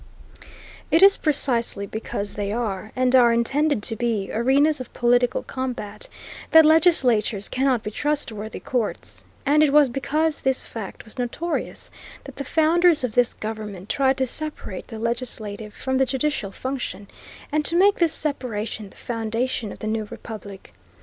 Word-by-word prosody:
It 330 +4 +4
is 395 0 +8
precisely 240 -8 +1
because 205 0 -4
they 205 -1 -3
are, 215 -2 -3
and 255 0 +2
are 240 -2 +6
intended 270 +2 +1
to 225 - -2
be, 220 -4 -2
arenas 275 +5 +2
of 255 - -9
political 245 0 +2
combat, 245 -6 -6 0.4
that 320 -1 +7
legislatures 255 - +4
cannot 255 -3 0
be 210 - -4
trustworthy 225 -6 -3
courts, 245 -4 -3 0.2
and 295 +2 +4
it 300 -2 +4
was 290 -2 +5
because 300 +5 -1
this 265 -1 +1
fact 220 -4 -8
was 220 +4 -6
notorious 305 +8 -4 0.3
that - - -12
the 280 - -3
founders 325 +2 +3
of 245 -4 -2
this 245 0 +2
government 215 -3 -7
tried 270 -1 +2
to 265 - +1
separate 295 - -2
the 225 - -8
legislative 220 -3 -4
from 260 +4 -2
the 265 - +4
judicial 265 -4 -1
function, 255 -4 -5 0.4
and 305 +1 +1
to 335 - +2
make 395 +3 +4
this 340 -2 +2
separation 225 -9 -3
the - - -20
foundation 230 -1 -2
of - - -9
the - - -8
new 220 0 -1
republic. 205 -2 -10
245 Hz, 155 wpm, -23 LUFS, 215-290 Hz, 0.4 s, is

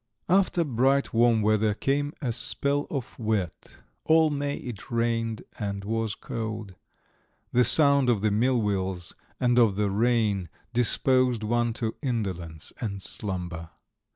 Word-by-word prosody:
XI - - +2
After 185 -3 +3
bright 135 0 +1
warm 115 -1 +3
weather 110 0 +2
came 145 +4 -1
a 125 - 0
spell 140 +4 0
of 135 -4 -5
wet; 105 -6 -3 0.2
all 160 -1 +4
May 145 0 -2
it 120 -5 -8
rained 115 -1 -1 0.2
and 100 -2 -4
was 110 0 -2
cold. 110 -3 -6 0.8
The 125 - +4
sound 140 +1 +6
of 115 -5 +2
the 110 0 +1
millwheels 100 -6 0 0.3
and 125 -1 +3
of 110 -5 +4
the 105 -1 0
rain 105 -4 +1 0.2
disposed 125 0 +3
one 120 +1 0
to 110 -1 -3
indolence 95 - -4
and 100 -4 -3
slumber. 90 -5 -5
115 Hz, 135 wpm, -26 LUFS, 105-125 Hz, 0.8 s, sound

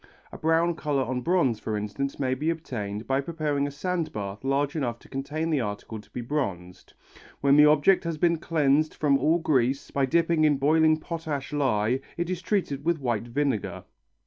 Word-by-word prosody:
A - - -8
brown 165 +2 +2
colour 145 -4 0
on 125 0 -3
bronze, 135 - +1
for 110 -1 -3
instance, 105 +7 -3
may 130 -2 +1
be 150 +5 -1
obtained 110 -10 -4
by 135 +1 +1
preparing 150 -2 -1
a - - -3
sand 170 +3 -2
bath 100 +1 -6
large 140 +2 0
enough 120 -6 -2
to - - -19
contain 150 +4 -3
the 145 -4 +2
article 105 0 -5
to - - -24
be 125 - -5
bronzed. 100 -10 -4 0.5
When 140 0 +5
the 150 0 +7
object 155 +6 +4
has 165 -2 -2
been 170 0 +2
cleansed 155 -2 +1
from 140 -2 +2
all 155 +5 +3
grease 135 -4 0
by 140 -1 +1
dipping 165 +2 +2
in 150 -2 +4
boiling 155 +3 +4
potash 155 -4 -5
lye, 130 -4 +1 0.2
it 170 +1 -2
is 180 -1 -3
treated 170 -8 -1
with 170 +1 +1
white 120 -5 -2
vinegar. 135 -3 -2
140 Hz, 190 wpm, -26 LUFS, 125-160 Hz, 0.5 s, the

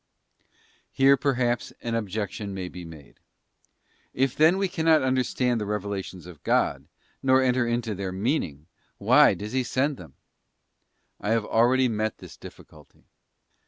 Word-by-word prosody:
f - - -41 0.5
Here, 135 +1 +5
perhaps, 125 -3 -1
an 115 - -3
objection 105 -2 -3
may 90 -2 -5
be 90 0 -9
made: 80 -4 -13 1.0
If 130 0 +1
then 160 +4 +4
we 195 0 +1
cannot 160 -4 +2
understand 130 -2 0
the 105 - -3
revelations 100 -3 -4
of 90 -5 -12
God, - - 0 0.3
nor 130 0 +4
enter 125 -1 +1
into 120 -2 -1
their 95 -1 -4
meaning, 95 - -2 0.3
why - - +5
does 105 +1 -7
He 130 -1 +1
send 135 +3 -1
them? 80 -7 -13 1.0
I 105 - -4
have 115 -1 +1
already 125 +4 +3
met 110 -1 -2
this - - -12
difficulty. 75 -2 -15
115 Hz, 145 wpm, -25 LUFS, 100-130 Hz, 1.0 s, Here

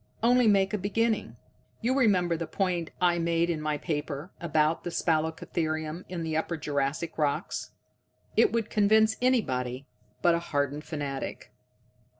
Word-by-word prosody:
Only 245 0 +5
make 195 -2 +3
a 210 - 0
beginning. 220 +3 0 0.5
You 245 +3 +1
remember 185 -10 +3
the 165 0 -4
point 180 -4 -1
I 175 -1 +3
made 170 0 +1
in 155 -2 -3
my 150 -1 -1
paper, 150 +1 -4
about 155 -1 +1
spalacotherium 160 0 -1
in 175 -2 -4
the 160 -1 -2
Upper 160 +1 -1
Jurassic 150 +2 -2
rocks. 145 -2 -1 0.7
It 435 - +5
would 225 -2 -1
convince 220 +1 +4
anybody 130 - 0 0.4
but 175 - +5
a 170 - +1
hardened 145 -2 -2
fanatic." 145 -4 -5
170 Hz, 140 wpm, -28 LUFS, 155-200 Hz, 0.7 s, Only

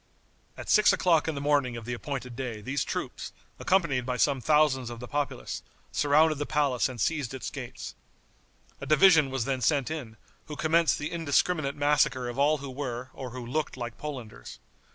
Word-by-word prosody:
At - - -8
six 215 -1 +6
o'clock 165 -4 +2
in 160 - -1
the 140 - -4
morning 140 -4 +1
of 115 - -8
the 120 - -3
appointed 125 -1 -5
day 125 -4 -4
these 130 +6 -2
troops, - - -5 0.3
accompanied 170 -9 +1
by 125 0 -2
some 135 0 +2
thousands 150 -4 +3
of 120 -1 -8
the 125 - -8
populace, 145 - -3 0.3
surrounded 150 +1 +3
the 145 - -2
palace 140 -5 +1
and 125 -2 -8
seized 140 0 -1
its 130 - -5
gates. 130 -3 -7 0.9
A - - -7
division 155 -2 +6
was 130 -3 -2
then 135 -2 -1
sent 145 0 +1
in, 125 -9 -6 0.3
who 150 - -6
commenced 160 -1 +2
the 150 - -4
indiscriminate 155 -2 +1
massacre 145 -4 +2
of 120 +2 -6
all 150 +2 +4
who 140 -1 -7
were, 130 -2 -5
or 130 - -7
who 125 0 -7
looked 145 +3 -2
like 120 -3 -5
Polanders. 125 - -8
140 Hz, 185 wpm, -28 LUFS, 125-150 Hz, 0.9 s, six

